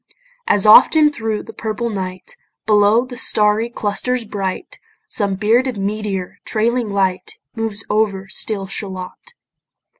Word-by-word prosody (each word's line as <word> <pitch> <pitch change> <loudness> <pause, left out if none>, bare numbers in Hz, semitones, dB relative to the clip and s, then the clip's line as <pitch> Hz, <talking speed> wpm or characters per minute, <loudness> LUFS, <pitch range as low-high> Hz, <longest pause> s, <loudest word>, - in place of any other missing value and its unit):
As 205 0 +3
often 300 +8 +7
thro' 225 -5 -3
the - - -11
purple 225 +1 -3
night, 185 -2 -6 0.3
Below 210 +3 +4
the 250 -1 -9
starry 215 +1 +2
clusters 235 +2 -2
bright, 200 - -5 0.3
Some 200 -3 +1
bearded 230 +5 +1
meteor, 200 -2 -4
trailing 235 +1 -1
light, 190 -2 -1 0.2
Moves 220 -2 -3
over 205 -2 0
still 195 +1 -2
Shalott. 195 - -7
210 Hz, 120 wpm, -18 LUFS, 195-230 Hz, 0.3 s, often